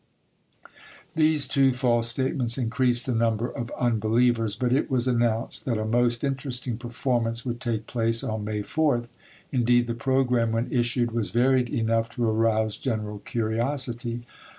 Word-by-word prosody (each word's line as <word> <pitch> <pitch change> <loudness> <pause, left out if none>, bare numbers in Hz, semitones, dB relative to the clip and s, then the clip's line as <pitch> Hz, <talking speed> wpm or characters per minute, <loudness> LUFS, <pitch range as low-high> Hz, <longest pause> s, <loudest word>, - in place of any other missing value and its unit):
These 155 -3 +3
two 135 -1 +3
false 120 -2 +1
statements 125 0 0
increased 125 0 +1
the 130 - -1
number 115 0 +1
of 120 -2 -6
unbelievers; 115 -1 +1
but 125 +1 0
it 140 - +1
was 130 -2 0
announced 120 0 0
that 120 -5 0
a 110 - -2
most 120 +2 +1
interesting 130 -3 -2
performance 120 -1 -2
would 120 -1 -4
take 115 -3 -2
place 115 -1 0
on 110 -1 -3
May 105 0 -3
4th; 120 -1 0 0.4
indeed, 120 -1 +3
the 120 - -3
programme 125 -1 +1
when 115 +2 -1
issued 120 -1 +1
was 115 -2 -1
varied 125 +1 +2
enough 115 0 0
to 120 -2 0
arouse 110 -1 +1
general 105 -5 -3
curiosity. 120 +1 -2
120 Hz, 150 wpm, -25 LUFS, 115-125 Hz, 0.4 s, These